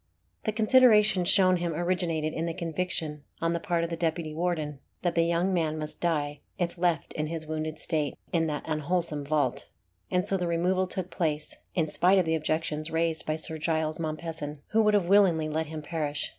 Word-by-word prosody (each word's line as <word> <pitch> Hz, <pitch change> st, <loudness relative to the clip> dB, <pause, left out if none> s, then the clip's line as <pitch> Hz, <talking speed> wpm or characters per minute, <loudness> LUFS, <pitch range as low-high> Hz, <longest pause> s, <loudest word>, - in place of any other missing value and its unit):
The 215 Hz, -, +1 dB
consideration 215 Hz, -4 st, +5 dB
shown 185 Hz, 0 st, +4 dB
him 170 Hz, -2 st, -2 dB
originated 170 Hz, -3 st, 0 dB
in 165 Hz, +1 st, -2 dB
the 165 Hz, -, -3 dB
conviction 165 Hz, -3 st, -3 dB, 0.2 s
on 165 Hz, 0 st, 0 dB
the 170 Hz, -, -1 dB
part 170 Hz, 0 st, 0 dB
of 170 Hz, -, -3 dB
the -, -, -1 dB
deputy 165 Hz, -1 st, -1 dB
warden, 155 Hz, -4 st, -2 dB, 0.2 s
that 175 Hz, -2 st, +1 dB
the 170 Hz, -, +3 dB
young 170 Hz, +3 st, +1 dB
man 160 Hz, -3 st, 0 dB
must 155 Hz, -1 st, -6 dB
die 150 Hz, -4 st, 0 dB, 0.2 s
if 175 Hz, -3 st, -1 dB
left 175 Hz, -3 st, 0 dB
in 155 Hz, 0 st, -2 dB
his 160 Hz, 0 st, -4 dB
wounded 155 Hz, 0 st, -3 dB
state 155 Hz, -3 st, 0 dB, 0.2 s
in 165 Hz, -1 st, +2 dB
that 150 Hz, -1 st, -3 dB
unwholesome 155 Hz, 0 st, -1 dB
vault, 150 Hz, 0 st, 0 dB, 0.4 s
and 180 Hz, +1 st, +1 dB
so 195 Hz, -1 st, +1 dB
the 180 Hz, -1 st, -1 dB
removal 180 Hz, +3 st, +1 dB
took 185 Hz, -1 st, -4 dB
place, 155 Hz, -3 st, -1 dB, 0.2 s
in 165 Hz, -4 st, +2 dB
spite 180 Hz, +5 st, +3 dB
of 185 Hz, -, +3 dB
the 160 Hz, -, +1 dB
objections 155 Hz, 0 st, -1 dB
raised 165 Hz, 0 st, 0 dB
to -, -, +2 dB
it -, -, -26 dB
by 155 Hz, -, +1 dB
Sir 160 Hz, 0 st, -1 dB
Giles 160 Hz, 0 st, 0 dB
Mompesson, 155 Hz, -2 st, -4 dB
who 225 Hz, -, +3 dB
would 210 Hz, -1 st, +4 dB
have 200 Hz, -4 st, +3 dB
willingly 180 Hz, -5 st, +4 dB
let 155 Hz, +1 st, -2 dB
him 155 Hz, 0 st, -6 dB
perish. 150 Hz, -2 st, -2 dB
165 Hz, 205 wpm, -28 LUFS, 155-180 Hz, 0.4 s, consideration